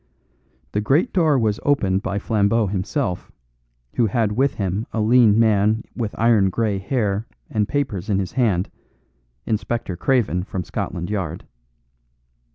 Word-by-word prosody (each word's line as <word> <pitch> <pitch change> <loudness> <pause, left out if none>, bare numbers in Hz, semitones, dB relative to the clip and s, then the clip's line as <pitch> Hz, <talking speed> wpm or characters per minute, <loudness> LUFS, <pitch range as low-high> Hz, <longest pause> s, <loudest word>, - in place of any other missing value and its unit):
The 105 - 0
great 145 - +2
door 160 -6 +3
was 110 -3 0
opened 100 -10 +1
by 100 0 -3
Flambeau 105 +2 +1
himself, 95 - -2 0.7
who 120 - +3
had 110 0 0
with 135 +6 +1
him 100 +2 -2
a 115 - -2
lean 110 -1 +5
man 110 -1 +3
with 115 -4 -4
iron 110 -4 +4
grey 105 0 -1
hair 105 0 -1 0.2
and 105 -2 0
papers 115 -9 -2
in 100 - +2
his 95 -2 -2
hand: 105 -8 +1 0.7
Inspector 110 -3 -2
Craven 110 - +1
from 95 -1 -4
Scotland 85 +2 -4
Yard. 90 -5 -3
105 Hz, 140 wpm, -21 LUFS, 100-120 Hz, 0.7 s, lean